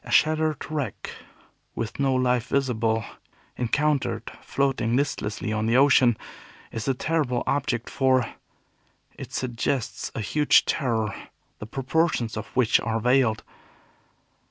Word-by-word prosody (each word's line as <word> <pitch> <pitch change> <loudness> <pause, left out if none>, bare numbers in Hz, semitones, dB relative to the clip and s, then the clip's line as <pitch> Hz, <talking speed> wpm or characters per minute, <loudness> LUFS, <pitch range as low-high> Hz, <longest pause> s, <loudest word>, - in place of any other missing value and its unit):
A - - -12
shattered 155 -1 +2
wreck, 150 -4 -4 0.6
with 115 +2 -4
no 135 -2 +2
life 125 -1 +1
visible, 115 -5 0 0.5
encountered 140 +4 0
floating 130 -4 0
listlessly 110 -6 -1
on 110 0 -1
the 115 +2 +3
ocean, 130 -4 +5 0.5
is 115 -1 -5
a 135 - +2
terrible 135 -4 0
object, 130 -4 -1
for 130 -2 +2 0.9
it - - -9
suggests 120 0 -2
a - - -2
huge 150 +8 +3
terror, 115 -6 0 0.5
the 105 - -7
proportions 135 -1 0
of - - -5
which 125 -3 +4
are 115 -1 -1
veiled. 125 -1 +2
125 Hz, 120 wpm, -25 LUFS, 115-140 Hz, 0.9 s, ocean